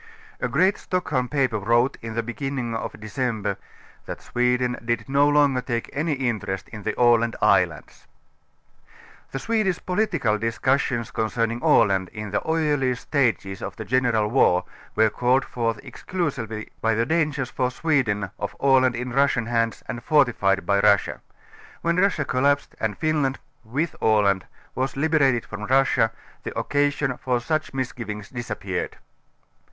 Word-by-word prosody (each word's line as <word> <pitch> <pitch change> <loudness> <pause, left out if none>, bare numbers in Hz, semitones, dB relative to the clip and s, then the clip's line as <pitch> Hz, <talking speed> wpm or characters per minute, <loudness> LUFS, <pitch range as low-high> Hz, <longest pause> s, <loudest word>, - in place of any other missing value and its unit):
A - - 0
great 190 +2 +2
Stockholm 150 -9 -1
paper 130 -7 +1
wrote 120 +6 +2
in 115 -1 -6
the 115 - 0
beginning 125 0 -3
of 115 - -5
December 110 -3 -2 0.5
.,that - - -5
Sweden 125 0 0
did 115 -2 -1
no 140 +2 +3
longer 145 -3 +3
take 120 -2 -3
any 150 +3 0
interest 110 -8 -2
in 105 -2 -8
the - - -3
Aland 115 -2 +4
islands". - - +1 1.2
The - - -5
Swedish 210 0 0
political 180 - 0
discussions 120 +1 0
concerning 115 +1 -1
Aland 95 -2 +3
in 105 -3 -6
the 100 - 0
earlier 145 -5 +1
stages 115 -8 -1
of 100 - -5
the 110 - -7
general. 120 -3 +2
war 90 -8 +3 0.3
were 110 0 +4
called 125 +2 +2
forth 115 -3 -2
ex - - -12
clusively 125 - -3
by 115 0 +2
the 115 +1 +1
dangers 150 -3 0
for 125 -1 0
Sweden 120 - 0
of 100 - -4
Aland 130 -2 +4
in 125 +1 -4
Russian 135 -3 +2
hands 115 -1 -1
and 120 - -5
fortified 110 - +2
by 100 +2 +2
Russia'. 100 -1 +3 0.6
When 170 +1 +1
Russia 195 +1 +2
collapsed 140 +2 +1
and 110 -2 -2
Finland 150 -4 0 0.3
ŌĆö - - -20
with 155 +6 -1
Aland 100 -3 +3
ŌĆö - - -22 0.3
was 130 +1 -2
liberated 140 -5 +2
from 105 0 -6
Russia, 130 -2 +3 0.3
the - - -6
occasion, 145 -2 0
for 125 -1 0
^uch 155 +6 -2
misgivings 115 -6 -5
disappeared. 110 -7 -4
125 Hz, 150 wpm, -24 LUFS, 110-140 Hz, 1.2 s, Aland